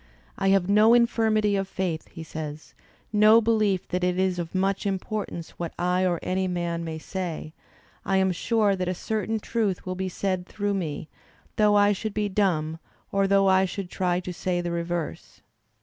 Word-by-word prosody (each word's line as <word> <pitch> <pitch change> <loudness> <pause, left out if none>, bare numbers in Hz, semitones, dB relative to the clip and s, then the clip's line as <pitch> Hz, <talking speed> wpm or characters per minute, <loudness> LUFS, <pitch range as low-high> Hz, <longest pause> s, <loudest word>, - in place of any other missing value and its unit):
"I 195 - -1
have 195 -2 +3
no 215 +3 +6
infirmity 220 -3 +3
of 195 -1 -1
faith," 180 -4 -3
he 165 - -9
says, 155 -1 -7 0.4
no 215 +2 +7
belief 215 -4 +1
that 180 0 -1
it 180 0 +1
is 185 -1 +1
of 170 +1 -5
much 195 +1 0
importance 195 -3 -4
what 170 -1 -4
I 180 +1 +1
or 175 -2 0
any 185 +1 0
man 170 -2 -2
may 160 -1 -4
say; 165 -2 -5 0.5
I 195 - +1
am 190 0 +3
sure 210 +2 +1
that 185 -1 -2
a 185 - -1
certain 220 +3 -2
truth 210 -4 -1
will 185 - -2
be 190 +1 -3
said 185 0 -2
through 205 -1 -2
me, 160 -6 -3 0.5
though 210 -1 +4
I 205 0 +5
should 215 +1 -5
be 210 -1 0
dumb, 165 -6 0 0.3
or 195 0 +2
though 195 0 +4
I 190 0 +5
should 190 -1 -5
try 180 -1 0
to 180 0 -6
say 175 +1 -1
the 175 0 -2
reverse." 170 -1 -4
190 Hz, 185 wpm, -26 LUFS, 175-205 Hz, 0.5 s, no